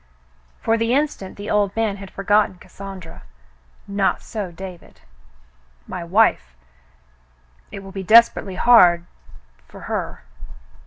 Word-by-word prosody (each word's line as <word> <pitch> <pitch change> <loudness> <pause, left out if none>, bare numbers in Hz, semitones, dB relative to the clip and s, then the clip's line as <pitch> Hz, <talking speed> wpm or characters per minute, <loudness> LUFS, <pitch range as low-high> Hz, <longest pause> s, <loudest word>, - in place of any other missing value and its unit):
'^" - - -35
For 225 0 +1
the 230 +2 +1
instant 280 -10 -2
the 205 +1 -6
old 205 -2 +1
man 220 -3 -1
had 195 -1 -10
for 195 - -8
gotten 205 -1 +3
Cassandra. 190 -2 -11 0.7
Not 200 -1 0
so 205 -5 -5
David. 180 0 -11 0.8
"My - - -6
wife. 170 - +2 1.2
It 195 - -8
will 195 - -10
be 195 0 -5
desperately 210 -1 +4
hard 175 -8 +5 0.3
— 60 0 -30
for - - -13
her." - - -5
195 Hz, 135 wpm, -21 LUFS, 180-215 Hz, 1.2 s, hard